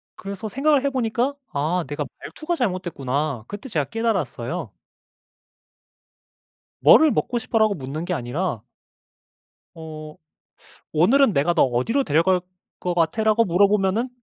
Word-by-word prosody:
그래서 200 +2 -6
생각을 275 +5 +2
해보니까 255 0 0 0.2
'아 160 +5 0
내가 145 0 -3 0.2
말투가 330 +2 -4
잘못됐구나.' 155 - -2
그때 210 +6 -8
제가 150 -8 0
깨달았어요. 225 - -2 2.1
"뭐를 315 -3 +7
먹고 240 - -1
싶어?" 230 -1 -2
라고 215 -2 +4
묻는 145 +1 -5
게 180 - -2
아니라 125 - -3 1.1
어 155 -1 -9 0.8
"오늘은 225 - +4
내가 150 +5 +2
너 170 - +4
어디로 130 - +1
데려갈 180 - +2 0.4
것 180 - -2
같아?"라고 215 +7 +2
물어보면은 200 +5 +2
185 Hz, 285 characters per minute, -23 LUFS, 155-230 Hz, 2.1 s, 뭐를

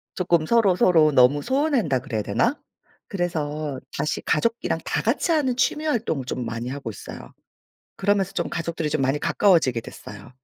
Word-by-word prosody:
쪼끔 170 -3 +1
서로서로 180 -7 +4
너무 140 +2 +4
소원한다 260 - +1
그래야 120 -5 -3
되나? 240 - 0 0.5
그래서 155 -6 -3 0.2
다시 150 - -2
가족이랑 230 +9 0
다 - - -1
같이 - - 0
하는 285 -6 +1
취미활동을 245 - -1
좀 125 -1 -4
많이 115 +2 -4
하고 135 -3 -5
있어요. 105 - -10 0.6
그러면서 195 -1 +1
좀 170 - -2
가족들이 165 -2 -3
좀 145 - -1
많이 135 +2 +1
가까워지게 160 - +2
됐어요. 105 +1 -11
160 Hz, 370 characters per minute, -23 LUFS, 135-205 Hz, 0.6 s, 서로서로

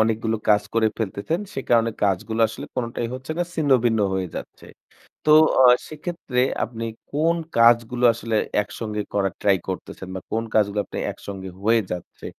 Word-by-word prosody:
অনেকগুলো 110 0 +1
কাজ 105 -1 +5
করে 115 -1 +3
ফেলতেছেন। 110 - -2
সে 135 - -3
কারণে 115 -1 +4
কাজগুলো 105 +3 0
আসলে 115 - -8
কোনটাই 120 -1 -2
হচ্ছে 130 +3 -8
না, 175 - +3
ছিন্নভিন্ন 125 -7 +2
হয়ে 95 -2 -2
যাচ্ছে। - - -9 0.6
তো 155 - +4 0.3
আ - - +7 0.3
সেক্ষেত্রে 155 -4 -4 0.2
আপনি 115 0 -5 0.3
কোন 160 +4 +2 0.2
কাজগুলো 120 +1 +4
আসলে 115 -1 -3 0.3
একসঙ্গে 105 0 -5
করার 95 -2 0
ট্রাই 100 -2 +4
করতেছেন? 95 0 -6
বা - - -3
কোন 115 +1 0
কাজগুলো 105 -1 +2
আপনি - - -8
একসঙ্গে 95 -1 -8
হয়ে 115 +2 +4
যাচ্ছে? 90 -1 -7
115 Hz, 155 wpm, -23 LUFS, 105-125 Hz, 0.6 s, আ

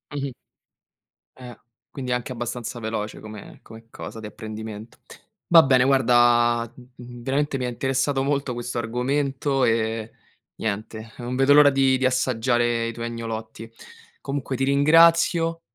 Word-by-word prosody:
Mh-mh 140 -2 -4 1.1
Eh, 125 -2 -10 0.4
quindi 130 -2 -6
è - - +3
anche 125 +1 -5
abbastanza 120 0 -5
veloce 110 -1 -4
come 110 -1 -11
come 115 0 -14
cosa 115 - -9
di 110 - -9
apprendimento. 110 0 -9 0.5
Va 170 -1 +8
bene 130 -2 +4
guarda, 120 -3 +3
mhmm, 125 -1 -13
veramente 135 +2 -1
mi 130 - -3
ha - - -2
interessato 135 +2 -1
molto 140 -2 -1
questo 120 0 -4
argomento, 135 +3 -1
ehm, 115 -1 0 0.5
niente, 110 +1 -5
non 120 +1 -4
vedo 135 +2 +4
l'ora 145 0 +7
di 135 -1 +2
di 130 - 0
assaggiare 120 -2 +1
i 115 - -5
tuoi 115 0 -6
agnolotti. 115 -1 -7 0.5
Comunque 135 -1 -4
ti 135 - -1
ringrazio, 165 +4 +4
125 Hz, 140 wpm, -23 LUFS, 115-135 Hz, 1.1 s, Va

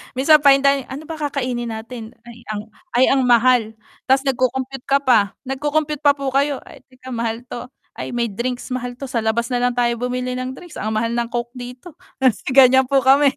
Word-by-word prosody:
minsan 300 +4 +5
fine 275 -1 +5
dining 275 -1 +2
"Ano 275 +4 -7
ba 320 0 -7
kakainin 255 -5 -2
natin? 225 0 -9
Ay 235 0 -13
ang 215 -1 -3 0.3
ay 250 - +5
ang 270 -1 +3
mahal!" 240 -2 +3 0.3
Ta's 265 +1 +3
nag-co-compute 260 0 -2
ka 280 0 +2
pa, 220 -6 +3
nag-co-compute 295 +2 -1
pa 285 -1 +4
po 275 -2 -3
kayo, 280 0 +1
"Ay, - - -14
teka 255 0 -12
mahal 230 0 -3
'to, 245 0 -8 0.3
ay 240 - -5
may 235 -3 -1
drinks 245 +4 -4
mahal 245 -1 -4
'to 265 0 -8
sa 235 - 0
labas 230 +2 -1
nalang 245 0 +1
tayo 240 -1 +2
bumili 250 0 -2
ng 255 +1 -4
drinks, 350 +2 -11
ang 215 0 -2
mahal 230 +1 0
ng 235 0 -1
Coke 240 0 -4
dito." 250 +6 -9 0.3
Kasi 260 -5 +1
ganyan 265 -1 +6
po 275 -1 +2
kami. 275 +1 +5
255 Hz, 200 wpm, -20 LUFS, 240-275 Hz, 0.3 s, ganyan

